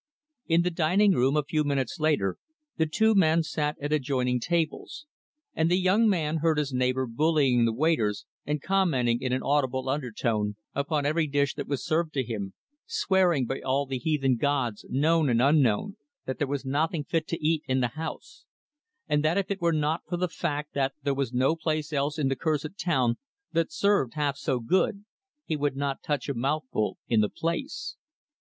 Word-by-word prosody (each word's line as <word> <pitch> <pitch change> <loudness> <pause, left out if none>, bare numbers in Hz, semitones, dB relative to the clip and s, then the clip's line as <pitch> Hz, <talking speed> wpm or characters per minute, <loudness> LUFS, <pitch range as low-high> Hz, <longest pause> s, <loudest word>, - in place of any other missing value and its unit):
In 165 0 +3
the 180 - 0
dining 180 +5 +3
room, 135 -3 +2
a 150 - +2
few 155 +2 0
minutes 135 -5 -1
later, 150 -12 +1 0.4
the 160 -1 +1
two 220 +8 +3
men 165 -4 +4
sat 150 -1 -2
at 145 +1 -2
adjoining 130 -3 0
tables; 165 - -2 0.5
and 160 +1 +1
the 180 - +3
young 200 +5 +3
man 160 -5 0
heard 160 0 +1
his 145 -3 -1
neighbor 130 +1 +1
bullying 135 -1 +2
the 115 - +2
waiters 115 -6 0 0.2
and 150 0 -3
commenting 140 -12 +1
in 130 - -2
an 130 - -1
audible 130 -2 0
undertone, 115 -6 -1 0.2
upon 145 +1 -1
every 155 +2 +1
dish 140 0 +1
that - - -6
was 135 -3 -3
served 160 0 0
to 135 - +1
him 105 -5 -5 0.3
swearing 190 - +2
by 135 +3 -4
all 135 +2 0
the 135 -1 -4
heathen 135 -3 +1
gods, 130 -5 -1
known 155 +3 +2
and 115 -1 +2
unknown, 140 - +2 0.3
that 130 - -4
there 145 - 0
was 140 0 -3
nothing 150 +3 0
fit 160 +2 -1
to 165 - -2
eat 160 -1 +2
in 130 0 +1
the 120 -2 +1
house; 160 +6 -8 0.6
and 150 -1 +1
that 160 +4 +2
if 200 0 -1
it 200 - -3
were 170 0 +3
not 155 +1 0
for 175 - -1
the 180 +1 0
fact 150 -3 -3
that 135 -1 0
there 140 -1 +1
was 135 -3 -2
no 130 +5 +2
place 155 -2 -2
else 145 +2 0
in 145 -3 +1
the 135 - 0
cursed 155 +4 -2
town 130 -9 +1 0.3
that 165 - 0
served 200 - +1
half 145 -2 0
so 135 -2 -1
good, 190 - 0 0.4
he 160 - -1
would 145 -2 -1
not 140 0 -2
touch 145 -4 -2
a 140 - -1
mouthful 130 -3 -1
in 115 -2 +3
the 105 - +1
place. 265 - -4
145 Hz, 190 wpm, -27 LUFS, 130-165 Hz, 0.6 s, men